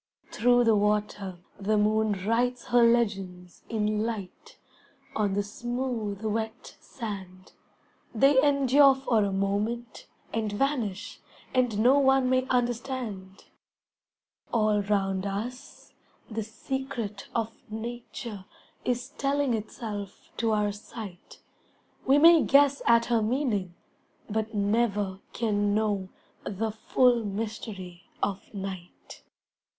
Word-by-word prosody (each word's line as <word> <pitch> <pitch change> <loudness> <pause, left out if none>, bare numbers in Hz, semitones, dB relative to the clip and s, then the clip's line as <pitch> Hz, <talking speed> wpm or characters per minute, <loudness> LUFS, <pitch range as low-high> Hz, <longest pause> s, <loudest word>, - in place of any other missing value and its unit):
Through 245 +1 +4
the 225 -2 +4
water 205 -2 0 0.2
the 210 +2 +1
moon 215 0 +2
writes 245 +2 0
her 240 0 +5
legends 195 -7 +1
In 215 -1 0
light, 225 - -6 0.6
on 205 -2 +1
the 205 - +1
smooth, 235 -3 -4
wet 220 +2 -3
sand; 190 -6 -8 0.6
They 265 +4 +5
endure 280 -1 +5
for 245 -5 +1
a 200 - 0
moment, 210 +5 -2 0.3
and 220 -2 -1
vanish, 225 -4 -2 0.3
And 250 -5 +2
no 250 +6 +5
one 265 -2 +4
may 255 0 +2
understand. 240 -6 -2 1.1
All 215 -2 +2
round 195 -1 0
us 225 +6 -6 0.4
the 220 +1 -2
secret 225 -1 -5
of 225 -1 -1 0.2
Nature 225 -2 -6 0.4
Is 250 +1 -1
telling 280 -2 +1
itself 210 -2 -6
to 230 -1 +1
our 210 -1 +1
sight, 205 -2 -10 0.6
We 270 +2 +6
may 330 +1 +8
guess 280 0 +4
at 235 0 +5
her 235 -2 +2
meaning 215 -7 -1 0.5
but 220 +1 -2
never 205 -2 +1
Can 205 -3 0
know 205 -3 0 0.3
the 215 +3 -2
full 240 +2 +2
mystery 200 -4 -6
of 195 -1 -2
night. 190 -3 -8
220 Hz, 110 wpm, -28 LUFS, 205-245 Hz, 1.1 s, may